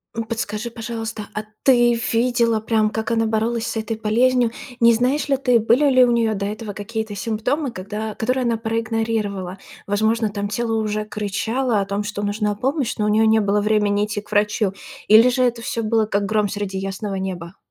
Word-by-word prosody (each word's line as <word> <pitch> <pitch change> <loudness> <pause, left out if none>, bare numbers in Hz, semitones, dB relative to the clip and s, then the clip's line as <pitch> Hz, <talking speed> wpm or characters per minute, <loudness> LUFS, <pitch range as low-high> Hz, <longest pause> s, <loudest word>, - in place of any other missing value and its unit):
М, 230 - -1
подскажи, 225 0 -4
пожалуйста, 225 -2 -5
а 215 - -3 0.2
ты 240 -2 +5 0.2
видела 235 -1 +2
прям, 220 -1 +1
как 220 +2 -3
она 225 -1 +2
боролась 225 +1 0
с - - -3
этой 220 0 -3
болезнью? 240 +2 +2 0.3
Не 235 0 +6
знаешь 255 +6 +1
ли 275 -1 +2
ты, 250 -3 +3
были 245 +7 +3
ли 255 -1 +6
у 245 - +1
неё 230 -2 +2
до 200 -1 -3
этого 210 +1 -5
какие-то 220 +1 -5
симптомы, 230 +7 -1
когда 210 +3 -5
которые 255 +2 0
она 235 -1 +1
проигнорировала? 220 -4 -2 0.3
Возможно, 220 +2 +1
там 200 0 -3
тело 225 +2 -2
уже 215 0 -2
кричало 215 +3 -1
о - - -2
том, 200 +1 -2
что 205 0 -4
нужна 205 0 -1
помощь, 265 +3 -1
но 210 - 0
у - - +1
нее 220 +1 +4
не 220 0 +4
было 205 0 +1
времени 210 -1 +2
идти 210 -1 -4
к 210 - -20
врачу. 210 -1 +1 0.3
Или 220 +4 +7
же 255 +1 +1
это 240 -1 0
всё 230 0 -3
было 220 0 +2
как 200 -1 -1
гром 210 0 +1
среди 200 -1 -4
ясного 195 +1 -4
неба? 185 -1 -5
220 Hz, 195 wpm, -21 LUFS, 205-235 Hz, 0.3 s, Или